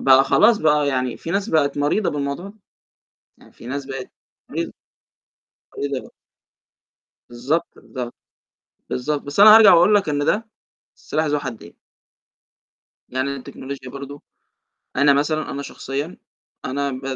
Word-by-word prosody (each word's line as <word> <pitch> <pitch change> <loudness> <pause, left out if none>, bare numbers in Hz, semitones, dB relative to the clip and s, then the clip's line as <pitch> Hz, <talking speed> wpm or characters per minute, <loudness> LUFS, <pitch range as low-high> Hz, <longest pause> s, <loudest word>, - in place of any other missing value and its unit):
بقى 135 0 +6
خلاص، 215 +9 +4
بقى 150 -2 +2
يعني 130 -3 -1
في 165 - -7
ناس 195 +4 -1
بقت 145 -5 +1
مريضة 150 +8 +1
بالموضوع 140 +4 -3
ده. 200 - -14 0.8
يعني، - - -20
في - - -15
ناس 140 +2 -4
بقت 135 -1 -7 0.4
مريضة - - -3 1.1
مريضة 140 -2 -3
ب - - -23 1.2
بالضبط، 135 +8 -1
بالض 125 -2 -7 0.8
بالضبط. 145 +3 -2
بس 145 +6 -5
أنا 215 +1 +10
هارجع 220 -4 +9
وأقول 180 +5 +5
لك 195 -6 +2
إن 145 0 0
ده، 220 +7 0 0.5
سلاح 155 - -2
ذو 150 -1 0
حدين. 125 -6 -8 1.4
يعني 130 +2 -2
أنا 140 - -4
التكنولوجيا 130 0 -8
برضه 140 +2 -9 0.7
أنا 140 +2 +5
مثلًا، 155 +2 0
أنا 140 - -4
شخصيًا، 140 +5 -5 0.5
أنا 140 +2 -2
ب 130 0 -6
140 Hz, 140 wpm, -21 LUFS, 135-160 Hz, 1.4 s, أنا